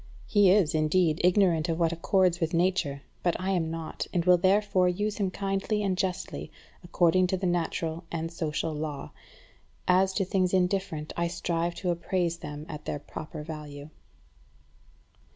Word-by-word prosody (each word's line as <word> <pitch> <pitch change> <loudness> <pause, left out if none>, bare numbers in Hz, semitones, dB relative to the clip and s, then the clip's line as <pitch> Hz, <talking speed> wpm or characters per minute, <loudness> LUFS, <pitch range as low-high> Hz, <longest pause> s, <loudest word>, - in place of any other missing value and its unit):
He 205 -3 +4
is, 185 -4 +4
indeed, 155 +1 +2
ignorant 175 -3 +3
of 165 - 0
what 165 -1 +2
accords 180 +1 +2
with 165 -1 -1
nature; 170 -6 0 0.2
but 175 -2 0
I 190 +1 -1
am 170 -4 0
not, 165 -1 -5
and 170 -2 0
will 180 -1 +6
therefore 190 -1 +3
use 205 +4 -2
him 200 -3 0
kindly 195 +2 -1
and 195 -2 +1
justly, 180 - -3 0.3
according 175 +1 +3
to 190 - 0
the 185 - -3
natural 170 -1 -1
and 165 0 -3
social 160 -1 -2
law. 150 -2 -5 0.8
As 185 +1 +4
to 195 -1 0
things 185 -1 +1
indifferent, 180 -4 -1
I 170 0 0
strive 170 0 -2
to 180 -2 -1
appraise 170 0 -1
them 150 -1 -7
at 150 -2 -8
their - - -2
proper 150 +1 -8
value." 150 -1 -8
175 Hz, 160 wpm, -28 LUFS, 160-185 Hz, 0.8 s, will